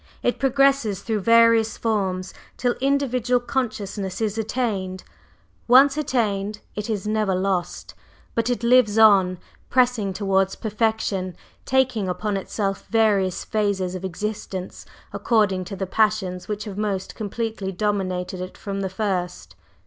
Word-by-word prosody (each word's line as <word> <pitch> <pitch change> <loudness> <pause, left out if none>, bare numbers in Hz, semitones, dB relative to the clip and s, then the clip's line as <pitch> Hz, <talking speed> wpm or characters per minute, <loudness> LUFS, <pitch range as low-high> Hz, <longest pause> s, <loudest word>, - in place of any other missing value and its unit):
It 245 - 0
progresses 270 -7 +2
through 220 -2 -1
various 230 +1 +4
forms 190 -5 -1 0.2
till 245 -1 +1
individual 255 -3 +1
consciousness 215 -6 -3
is 215 -2 -1
attained. 210 -5 -2 0.6
Once 270 +3 +7
attained, 215 -8 -1
it 210 +2 -5
is 210 -2 -2
never 215 -3 +1
lost, 185 -1 -2 0.4
but 230 +1 0
it 245 -1 -1
lives 235 -3 +4
on, 195 -4 +6 0.3
pressing 245 -6 +2
towards 195 0 +1
perfection, 215 -4 -1 0.3
taking 255 -7 +1
upon 200 +3 -2
itself 195 0 -3
various 205 -5 +2
phases 200 -4 -1
of 185 0 -6
existence 190 0 -5 0.3
according 200 -5 +1
to 195 +2 -6
the 190 0 -3
passions 195 -3 0
which 210 0 -3
have 205 -2 -6
most 195 -3 -2
completely 220 -2 -4
dominated 185 -2 -2
it 185 - -7
from 195 -1 -4
the 190 - -2
first. 180 - -3
210 Hz, 130 wpm, -23 LUFS, 190-230 Hz, 0.6 s, Once